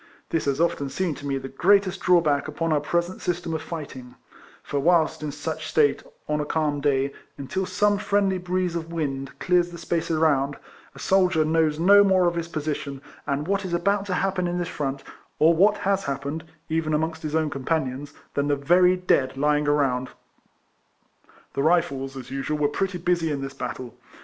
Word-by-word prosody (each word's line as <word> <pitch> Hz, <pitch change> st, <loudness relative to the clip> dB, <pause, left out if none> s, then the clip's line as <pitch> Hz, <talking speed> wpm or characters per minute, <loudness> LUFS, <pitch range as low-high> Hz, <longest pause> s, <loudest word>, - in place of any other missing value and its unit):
This 165 Hz, -, 0 dB
has 140 Hz, 0 st, 0 dB
often 155 Hz, -4 st, 0 dB
seemed 165 Hz, +1 st, -2 dB
to 145 Hz, -, -7 dB
me 135 Hz, -1 st, 0 dB
the 135 Hz, -, -6 dB
greatest 190 Hz, +7 st, +2 dB
drawback 160 Hz, -6 st, +3 dB
upon 160 Hz, +1 st, -1 dB
our 150 Hz, -, +3 dB
present 170 Hz, +4 st, -2 dB
system 175 Hz, -2 st, -2 dB
of 160 Hz, -, -2 dB
fighting; 140 Hz, -7 st, -8 dB, 0.5 s
for 145 Hz, -, -2 dB
whilst 165 Hz, +1 st, +2 dB
in 150 Hz, -1 st, -3 dB
such 155 Hz, +2 st, -5 dB
state, 150 Hz, -2 st, +3 dB, 0.3 s
on 150 Hz, 0 st, 0 dB
a -, -, 0 dB
calm 150 Hz, -2 st, -1 dB
day, 140 Hz, -1 st, +1 dB, 0.2 s
until 185 Hz, +8 st, -3 dB
some 205 Hz, -1 st, +2 dB
friendly 200 Hz, -2 st, +1 dB
breeze 180 Hz, -1 st, -1 dB
of 165 Hz, 0 st, -4 dB
wind 140 Hz, -5 st, -3 dB
clears 175 Hz, -1 st, +2 dB
the 170 Hz, -, -9 dB
space 170 Hz, 0 st, -2 dB
around, 145 Hz, -4 st, +2 dB, 0.4 s
a -, -, -13 dB
soldier 185 Hz, -4 st, +2 dB
knows 155 Hz, -1 st, +2 dB
no 200 Hz, +5 st, +7 dB
more 190 Hz, -2 st, +4 dB
of 175 Hz, -, +2 dB
his 170 Hz, -1 st, -3 dB
position 150 Hz, -3 st, -4 dB, 0.3 s
and 140 Hz, +2 st, -1 dB
what 200 Hz, +1 st, 0 dB
is 180 Hz, -2 st, -2 dB
about 200 Hz, +3 st, 0 dB
to 185 Hz, -, -1 dB
happen 185 Hz, -1 st, 0 dB
in 175 Hz, 0 st, -2 dB
his 175 Hz, -1 st, -2 dB
front, 140 Hz, -5 st, -3 dB, 0.3 s
or 160 Hz, +2 st, +5 dB
what 200 Hz, +5 st, +4 dB
has 195 Hz, 0 st, +1 dB
hap 140 Hz, -1 st, -3 dB
pened 145 Hz, +3 st, -3 dB, 0.3 s
(even 160 Hz, -1 st, 0 dB
amongst 160 Hz, +1 st, -2 dB
his 155 Hz, 0 st, -3 dB
own 155 Hz, -2 st, +1 dB
companions) 140 Hz, -1 st, -2 dB, 0.2 s
than 140 Hz, 0 st, 0 dB
the 145 Hz, -, +2 dB
very 180 Hz, +6 st, +4 dB
dead 135 Hz, -7 st, +1 dB
lying 150 Hz, +1 st, +2 dB
around. 135 Hz, -4 st, +1 dB, 1.4 s
The 140 Hz, -, -1 dB
Rifles, 140 Hz, -4 st, +1 dB
as 130 Hz, -1 st, -9 dB
usual, 135 Hz, +3 st, -2 dB
were 145 Hz, -1 st, +2 dB
pretty 185 Hz, +4 st, -2 dB
busy 170 Hz, -2 st, 0 dB
in 140 Hz, -2 st, -2 dB
this 135 Hz, 0 st, -5 dB
battle. 125 Hz, -2 st, -6 dB
160 Hz, 190 wpm, -24 LUFS, 140-175 Hz, 1.4 s, no